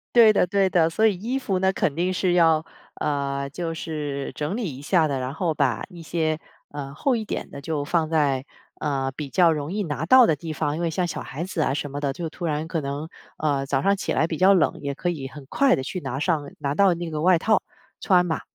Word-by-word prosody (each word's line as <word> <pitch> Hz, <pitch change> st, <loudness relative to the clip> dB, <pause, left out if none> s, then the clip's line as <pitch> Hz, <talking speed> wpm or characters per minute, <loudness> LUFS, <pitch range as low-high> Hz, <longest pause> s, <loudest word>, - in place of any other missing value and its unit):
对 225 Hz, -2 st, +8 dB
的 180 Hz, -, +3 dB
对 195 Hz, +1 st, +2 dB
的， 165 Hz, -3 st, +3 dB
所 220 Hz, +7 st, +2 dB
以 210 Hz, -4 st, +4 dB
衣 235 Hz, +8 st, -2 dB
服 195 Hz, -8 st, -1 dB
呢， 190 Hz, 0 st, +3 dB
肯 145 Hz, -, 0 dB
定 180 Hz, +3 st, 0 dB
是 180 Hz, -1 st, +1 dB
要 165 Hz, -2 st, +4 dB, 0.3 s
呃， 140 Hz, -1 st, -2 dB
就 165 Hz, +3 st, -4 dB
是 150 Hz, -4 st, -4 dB
整 150 Hz, +7 st, -2 dB
理 190 Hz, -, -3 dB
一 -, -, -10 dB
下 160 Hz, +1 st, +3 dB
的， 140 Hz, -3 st, -2 dB
然 130 Hz, +2 st, -3 dB
后 165 Hz, -1 st, -1 dB
把 135 Hz, -6 st, 0 dB
一 175 Hz, -2 st, -11 dB
些， 160 Hz, -1 st, -1 dB, 0.3 s
呃， 140 Hz, -1 st, -7 dB
厚 255 Hz, -, +1 dB
一 220 Hz, -, -3 dB
点 -, -, -4 dB
的 140 Hz, -, -8 dB
就 150 Hz, 0 st, -2 dB
放 160 Hz, +1 st, 0 dB
在， 140 Hz, -4 st, +1 dB, 0.3 s
呃， 135 Hz, -3 st, -1 dB
比 150 Hz, -2 st, -5 dB
较 175 Hz, +2 st, +4 dB
容 150 Hz, +1 st, -3 dB
易 205 Hz, 0 st, -1 dB
拿 155 Hz, -1 st, -3 dB
到 255 Hz, +6 st, +8 dB
的 160 Hz, -, +2 dB
地 155 Hz, +2 st, -6 dB
方， 145 Hz, +1 st, -1 dB
因 170 Hz, -, -4 dB
为 170 Hz, -, 0 dB
像 175 Hz, +3 st, 0 dB
小 170 Hz, -, -4 dB
孩 145 Hz, +6 st, -5 dB
子 175 Hz, -3 st, -3 dB
啊 135 Hz, -, +1 dB
什 145 Hz, 0 st, -3 dB
么 145 Hz, -, -4 dB
的， 140 Hz, -2 st, -1 dB
就 165 Hz, +2 st, -4 dB
突 175 Hz, +2 st, -6 dB
然 155 Hz, 0 st, -1 dB
可 165 Hz, -2 st, -2 dB
能， 140 Hz, +3 st, -4 dB, 0.3 s
呃， 140 Hz, -3 st, 0 dB
早 135 Hz, 0 st, 0 dB
上 200 Hz, 0 st, +3 dB
起 -, -, -2 dB
来 160 Hz, -, +2 dB
比 160 Hz, -, -3 dB
较 190 Hz, +2 st, +6 dB
冷， 185 Hz, -, +2 dB
也 140 Hz, -1 st, -3 dB
可 175 Hz, -, -1 dB
以 140 Hz, -6 st, -4 dB
很 140 Hz, 0 st, -11 dB
快 275 Hz, -, +3 dB
地 130 Hz, -, -4 dB
去 180 Hz, +6 st, -4 dB
拿 135 Hz, -3 st, -4 dB
上 150 Hz, -3 st, 0 dB
拿 140 Hz, -1 st, -1 dB
到 195 Hz, +2 st, +4 dB
那 170 Hz, -1 st, -5 dB
个 155 Hz, 0 st, -3 dB
外 180 Hz, 0 st, +5 dB
套 215 Hz, +5 st, +2 dB, 0.4 s
穿 180 Hz, -3 st, +3 dB
嘛。 160 Hz, -2 st, -2 dB
160 Hz, 270 characters per minute, -24 LUFS, 145-180 Hz, 0.4 s, 对